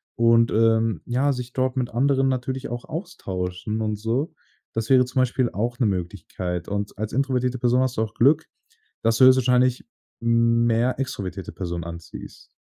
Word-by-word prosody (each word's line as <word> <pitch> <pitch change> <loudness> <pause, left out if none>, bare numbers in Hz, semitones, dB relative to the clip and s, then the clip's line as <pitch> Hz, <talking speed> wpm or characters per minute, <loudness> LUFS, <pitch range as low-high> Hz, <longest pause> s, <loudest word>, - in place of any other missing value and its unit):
und, 115 0 +4
ähm, 110 -4 +2
ja, 135 +4 +1
sich 125 -1 -6
dort 130 0 -1
mit 125 -2 0
anderen 135 +2 +2
natürlich 130 0 -2
auch 120 0 -5
austauschen 100 - -4
und 110 -1 -1
so. 115 +9 -2 0.4
Das 115 +2 -3
wäre 130 -1 +7
zum 130 +1 -2
Beispiel 125 -1 +1
auch 120 +4 -3
'ne 120 - +3
Möglichkeit. 90 -2 -4
Und 100 0 -3
als 110 0 -3
introvertierte 130 -1 0
Person 125 +1 +2
hast 130 -1 -1
du 110 - +2
auch 110 -1 -6
Glück, 145 +8 +3 0.6
dass 115 0 +2
du 130 - +7
höchstwahrscheinlich 125 -1 +4 0.4
mehr 115 +1 +2
extrovertierte 100 -8 -4
Personen 85 -2 -4
anziehst. 85 0 -10
120 Hz, 160 wpm, -23 LUFS, 110-130 Hz, 0.6 s, wäre